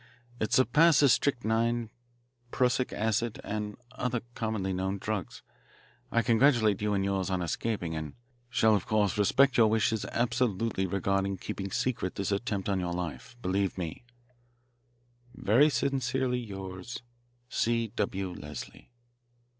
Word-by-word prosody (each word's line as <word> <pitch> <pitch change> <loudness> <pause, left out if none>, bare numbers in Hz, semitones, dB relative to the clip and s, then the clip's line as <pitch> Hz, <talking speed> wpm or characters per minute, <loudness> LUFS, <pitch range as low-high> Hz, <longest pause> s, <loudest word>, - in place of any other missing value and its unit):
It 110 - -1
surpasses 140 +2 +5
strychnine, 115 -3 0 0.6
prussic 125 +1 +1
acid, 110 +1 -1
and 105 0 -4
other 125 -2 -2
commonly 110 -5 -2
known 95 +2 -1
drugs. 100 -3 -4 0.7
I 115 - +2
congratulate 115 -3 +4
you 105 -1 +1
and 95 0 0
yours 95 -1 0
on 95 -2 0
escaping 85 -1 -2
and 80 -2 -5 0.3
shall 110 -4 +4
of 100 - -2
course 105 -3 +2
respect 125 +6 +4
your 115 - +7
wishes 110 0 +1
absolutely 115 -4 0
regarding 95 +1 0
keeping 95 +2 -5
secret 105 -3 -1
this 100 0 -2
attempt 100 -1 -1
on 100 -2 +1
your 90 -1 -2
life. 90 +6 -5
Believe 95 +1 0
me, 85 +4 -5 1.3
"Very 125 +9 +4
sincerely 130 -3 0
yours, 95 +1 -7 0.4
"C. 115 -1 0
W. 95 -3 -2
LESLIE." 75 -4 -9
105 Hz, 125 wpm, -29 LUFS, 95-120 Hz, 1.3 s, your